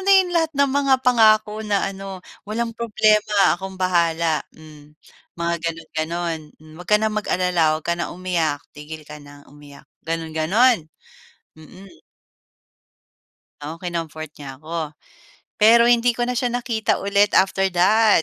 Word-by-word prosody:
na 395 - +4
'yong 370 -2 +2
lahat 325 -2 +1
ng 280 -1 +3
mga 275 -1 +3
pangako 215 -3 +4
na 205 -2 0
ano, 195 -1 -8 0.3
"Walang 230 +2 -2
problema 215 -3 +2
akong 190 +1 -8
bahala," 170 -3 +1
hmm, 150 -1 -16 0.4
mga 170 0 -1
gano'n 165 -1 -4
gano'n. 165 +1 -2 0.2
Hmm, 155 0 -16
"Wag 180 - -12
ka 210 - +5
nang 215 0 -1
mag-alala, 180 -6 +1
'wag 155 - -11
ka 170 - 0
ng 170 - -3
umiyak, 170 -5 -2
tigil 150 +1 -10
ka 150 +1 -10
nang 145 0 -15
umiyak," 145 -1 -15 0.2
gano'n 165 -1 -4
gano'n. 210 +10 +3 0.8
Mhm. 185 +5 -15 1.6
Oo, 160 +2 -7
kinomfort 165 -3 -5
niya 135 -2 -10
ako. 160 -1 -5 0.7
Pero 225 +2 +6
hindi 240 0 +3
ko 240 - -3
na 245 0 -1
siya 245 0 -1
nakita 235 -5 -1
ulit 200 +1 +2
after 195 0 +3
that. 210 +1 +4
185 Hz, 150 wpm, -21 LUFS, 160-220 Hz, 1.6 s, Pero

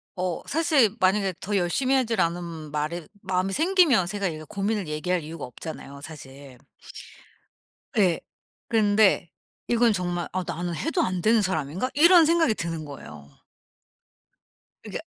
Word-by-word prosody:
어 180 -2 -2
사실 285 -9 +3
만약에 190 0 +2
더 205 +1 -3
열심히 255 +10 +1
하질 235 -4 +1
않으면 170 -3 -3
말에 155 +3 -3
마음이 190 +1 -1
생기면 315 - +3
제가 200 0 -2
이게 155 -2 -5
고민을 200 -1 -2
얘기할 170 +3 -1
이유가 160 -1 -7
없잖아요 140 +1 -9
사실. 140 -3 -11 1.4
예. 185 -5 +3 0.5
그런데 210 -5 +3 0.4
이건 235 -2 +3
정말 175 -2 -2
'아 185 -1 -1
나는 175 0 -4
해도 325 - -1
안 185 - -1
되는 220 +2 +4
사람인가?' 185 - -2
이런 340 +3 +7
생각이 325 -6 +3
드는 165 -2 -4
거예요. 75 - -11 1.6
그러니까 - - -6
185 Hz, 300 characters per minute, -25 LUFS, 160-225 Hz, 1.6 s, 이런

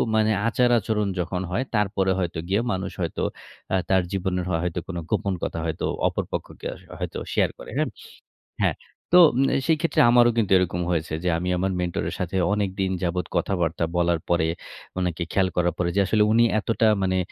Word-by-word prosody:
মানে 110 0 +3 0.2
আচার-আচরণ 115 -3 +2
যখন 90 +1 -2
হয় 115 +8 0
তারপরে 100 -2 +1
হয়তো 85 -3 -2
গিয়ে 100 +4 +2
মানুষ 95 0 -3
হয়তো 85 - -2 0.5
আ - - +4
তার 95 -1 +4
জীবনের 95 -2 -1
হ - - -1
হয়তো 90 -1 -2
কোনো 90 -3 -4
গোপন 100 - 0
কথা 85 - -2
হয়তো 80 -1 -2 0.2
অপর - - -1
পক্ষকে - - -5 0.3
হয়তো - - -4 0.2
শেয়ার - - +3
করে - - -10
হ্যাঁ। - - +1 0.7
হ্যাঁ, - - +1 0.4
তো 180 - +9 0.2
ম - - +4 0.2
সেই 160 -1 +3
ক্ষেত্রে 165 - +2
আমারও 120 0 +6
কিন্তু 105 -5 +1
এরকম 90 -1 0
হয়েছে 80 -2 -1
যে 90 - +1
আমি 90 +2 -2
আমার 95 +2 0
মেন্টরের 90 -1 -2
সাথে 90 +1 -3 0.2
অনেকদিন 95 -2 -1
যাবৎ 90 0 -1
কথাবার্তা 85 -3 0
বলার 85 -1 +2
পরে, 85 -2 +2 0.5
অনেকে 90 -2 -1
খেয়াল 95 -1 +2
করার 85 -1 +1
পরে 85 -1 0
যে - - +3
আসলে 105 +3 +3
উনি 115 +1 +5 0.2
এতটা 115 +2 +1 0.2
মানে 95 0 +1
95 Hz, 180 wpm, -24 LUFS, 90-105 Hz, 0.7 s, তো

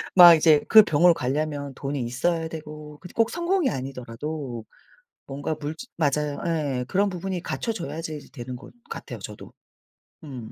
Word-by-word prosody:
막 175 -2 +11
이제 155 -1 +4
그 220 -1 +10
병원을 170 -1 +5
가려면 145 0 -2
돈이 140 +2 -3
있어야 160 +8 -1
되고 150 -2 -9
근데 180 - -11
꼭 230 0 +2
성공이 345 -2 +1
아니더라도 130 -1 -5 0.6
뭔가 145 +3 -3
물질 155 +11 -6
맞아요. 150 -2 0
예. 145 -7 -1
그런 200 +2 +2
부분이 185 0 -4
갖춰져야지 165 -8 -4
되는 125 +1 -7
것 - - -14 0.2
같아요, 460 - -7
저도. - - -10 0.7
음. 125 -7 -8
150 Hz, 315 characters per minute, -25 LUFS, 135-175 Hz, 0.7 s, 막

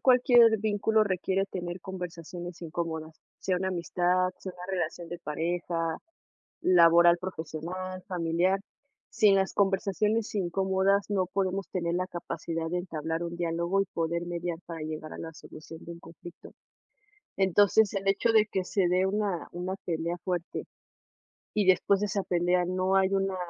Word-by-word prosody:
cualquier 245 -3 +6
vínculo 215 +1 +2
requiere 190 0 0
tener 175 -1 -4
conversaciones 175 -1 -7
incómodas, 160 -1 -5 0.2
sea 185 -1 0
una 190 +1 -1
amistad, 180 +1 +1
sea 185 - -7
una 180 0 -9
relación 175 -1 -3
de 175 - -5
pareja, 165 +1 -2 0.6
laboral, 170 -1 +6
profesional, 185 +1 -5
familiar. 180 +2 +1 0.5
Sin 210 -4 +4
las 190 0 0
conversaciones 205 +3 +1
incómodas, 190 +1 +1
no 195 -3 +1
podemos 190 +1 -1
tener 170 -2 -1
la 185 +1 0
capacidad 165 -2 -4
de 175 - -2
entablar 165 -2 -3
un 170 0 -4
diálogo 170 +3 0
y 195 - 0
poder 170 +1 -1
mediar 175 -1 -3
para 165 -2 -6
llegar 155 0 -6
a - - -8
la 165 - -6
solución 155 +1 -12
de 170 - -7
un 170 - -11
conflicto. 170 +1 -12 0.8
Entonces, 200 +2 +4
el 195 0 -2
hecho 200 +4 +3
de 220 -1 +5
que 190 -3 -1
se 180 0 +1
dé 180 +2 +2
una 200 -3 -1
una 180 +2 -4
pelea 170 0 -2
fuerte 175 -1 -3 0.9
y 210 -3 +1
después 190 +1 +4
de 210 - 0
esa 200 -1 -1
pelea 180 0 +2
no 185 +1 0
hay 190 0 +4
una 195 -1 0
180 Hz, 155 wpm, -28 LUFS, 170-195 Hz, 0.9 s, cualquier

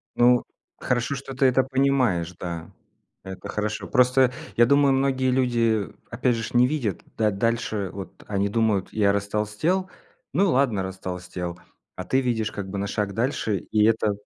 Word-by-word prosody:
Ну 125 0 +5 0.4
хорошо, 125 +3 0
что 135 0 -7
ты 135 - +2
это 130 0 +4
понимаешь, 130 -11 +1
да. 85 -2 -6 0.5
Это 95 0 -8
хорошо. 105 +1 -3
Просто 125 0 +4 0.2
я 120 - +6
думаю 140 +2 +4
многие 135 -1 +1
люди 115 -5 +1 0.2
опять 120 0 +1
же 115 - -3
ж 115 - -6
не 120 0 +5
видят 130 -9 -2 0.2
да 110 -1 +2
дальше. 110 -1 -1
Вот 95 -1 -9
они 100 -1 0
думают: 105 -3 0
"Я 105 -2 +3
растолстел, 105 - -1 0.4
ну 195 -2 +3
ладно 125 -7 +2
растолстел", 90 -2 -6 0.4
а - - -5
ты 130 - +2
видишь 115 -4 -1
как 100 -2 -6
бы 100 - -4
на 100 +1 -2
шаг 100 -1 -2
дальше 110 -3 0
и 105 -1 +3
это 110 -1 +2
115 Hz, 165 wpm, -24 LUFS, 100-130 Hz, 0.5 s, я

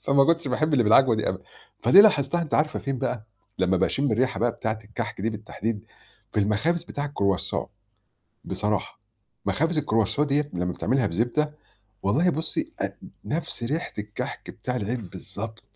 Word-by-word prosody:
فما 140 0 +5
كنتش 165 0 +2
باحب 155 +5 +1
اللي 125 -5 +4
بالعجوة 115 +3 +6
دي 110 - 0
أبدًا - - -3 0.4
فدي 195 - +9
لاحظتها 170 -6 +4
أنتِ 155 - -2
عارفة 155 +1 +2
فين 135 -1 -3
بقى؟ 115 -2 -2 0.3
لما 95 0 +3
باشم 120 +8 +1
الريحة 120 -3 +1
بقى 120 +1 +3
بتاعة 110 -1 -2
الكحك 105 -1 -5
دي 110 +4 0
بالتحديد 110 -1 -4 0.5
في 105 - +2
المخابز 115 +12 +1
بتاع 145 -3 -4
الcroissant 100 -2 +1 0.8
بصراحة، 105 0 -2 0.5
مخابز 155 - +1
الcroissant 115 -1 +1
ديّة 145 0 +1
لما 90 0 -1
بتعملها 130 +7 +1
بزبدة 120 - 0 0.5
والله 145 - +3
بُصي 160 0 -2
آت - - -3 0.3
نفس 160 -5 -3
ريحة 150 +8 -2
الكحك 105 0 -5
بتاع 125 0 -4
العيد 110 -2 -3
بالضبط، 100 +4 -8
120 Hz, 155 wpm, -26 LUFS, 105-145 Hz, 0.8 s, فدي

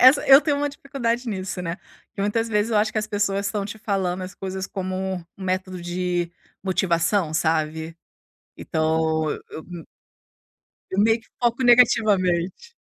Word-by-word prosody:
essa 260 +3 +7
eu 270 +1 +9
tenho 295 -2 0
uma 290 0 0
dificuldade 255 -4 -3
nisso, 185 -3 -4
né, 170 0 -3 0.4
que 200 - -5
muitas 225 +3 0
vezes 210 +1 +1
eu 220 - +2
acho 215 +1 +2
que 215 - 0
as 215 - -2
pessoas 200 -1 0
estão 200 -1 -2
te 220 +2 -7
falando 190 -4 -1
as 185 +1 -7
coisas 190 0 -5
como 185 -1 -4
um 190 -2 -3 0.2
método 185 -1 -2
de 175 0 -2 0.3
motivação, 180 -2 +1
sabe? 160 +1 0 0.6
Então, 160 0 0
e - - -4
eu 160 - -8
me 175 -3 -9 1.1
eu 190 - -3
meio 225 +2 +4
que - - -26
foco 240 +2 +2
negativamente. 215 - +3
190 Hz, 165 wpm, -23 LUFS, 175-225 Hz, 1.1 s, eu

